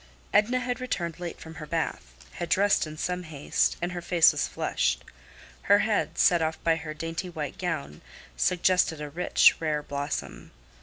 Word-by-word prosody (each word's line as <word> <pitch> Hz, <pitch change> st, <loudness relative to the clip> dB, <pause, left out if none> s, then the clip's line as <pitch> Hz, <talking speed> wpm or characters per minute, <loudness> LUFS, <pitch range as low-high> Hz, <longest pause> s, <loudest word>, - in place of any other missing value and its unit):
Edna 215 Hz, +5 st, +3 dB
had 250 Hz, 0 st, -3 dB
returned 175 Hz, -9 st, -3 dB
late 175 Hz, -1 st, -6 dB
from 160 Hz, -, -10 dB
her 155 Hz, -, -7 dB
bath, 160 Hz, -, -3 dB, 0.2 s
had 175 Hz, -1 st, -5 dB
dressed 200 Hz, -4 st, +3 dB
in 155 Hz, 0 st, -9 dB
some 180 Hz, +3 st, -2 dB
haste, 155 Hz, +1 st, -1 dB
and 175 Hz, -, -1 dB
her 175 Hz, -1 st, -5 dB
face 170 Hz, -1 st, +5 dB
was -, -, -1 dB
flushed. -, -, -1 dB, 0.7 s
Her 200 Hz, -, +8 dB
head, 215 Hz, -1 st, 0 dB
set 175 Hz, -2 st, +4 dB
off 160 Hz, 0 st, -1 dB
by 165 Hz, -1 st, +3 dB
her 155 Hz, -1 st, -7 dB
dainty 165 Hz, +3 st, -4 dB
white 150 Hz, -5 st, -5 dB
gown, 160 Hz, -, -4 dB, 0.3 s
suggested 180 Hz, -, +2 dB
a 150 Hz, -1 st, -6 dB
rich, 175 Hz, +4 st, +4 dB
rare 150 Hz, -2 st, -1 dB
blossom. 145 Hz, +1 st, -5 dB
165 Hz, 170 wpm, -27 LUFS, 155-180 Hz, 0.7 s, Her